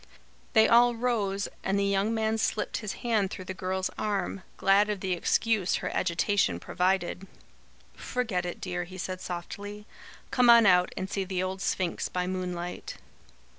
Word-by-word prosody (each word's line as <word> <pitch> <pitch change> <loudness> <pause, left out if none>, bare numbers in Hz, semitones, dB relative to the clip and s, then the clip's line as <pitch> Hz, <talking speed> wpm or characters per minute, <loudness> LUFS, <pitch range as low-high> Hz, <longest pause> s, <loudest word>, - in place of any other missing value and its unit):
They 220 0 +6
all 240 +1 +5
rose, 210 -5 0 0.2
and 195 +1 0
the 200 - +1
young 200 +2 +1
man 220 0 0
slipped 220 - -1
his 210 -2 -4
hand 215 -5 +2
through 185 - -7
the 190 - -5
girl's 185 0 -2
arm, 200 -2 -2 0.2
glad 200 +2 +4
of 210 -2 -2
the 185 -1 -1
excuse 200 +2 +1
her - - -3
agitation 185 - +1
provided. 185 - -1 0.7
"Forget 225 -8 -2
it, 175 -1 -5
dear," 175 -1 -3
he 185 +2 -10
said 185 0 -4
softly. 205 +4 -6 0.5
"Come 250 -2 +4
on 235 -1 +8
out 180 -2 +5
and 190 - -2
see 195 0 -2
the 185 -1 -2
old 190 +1 -4
Sphinx 180 -3 -1
by 180 0 -2
moonlight." 180 -1 -4
195 Hz, 165 wpm, -28 LUFS, 185-210 Hz, 0.7 s, on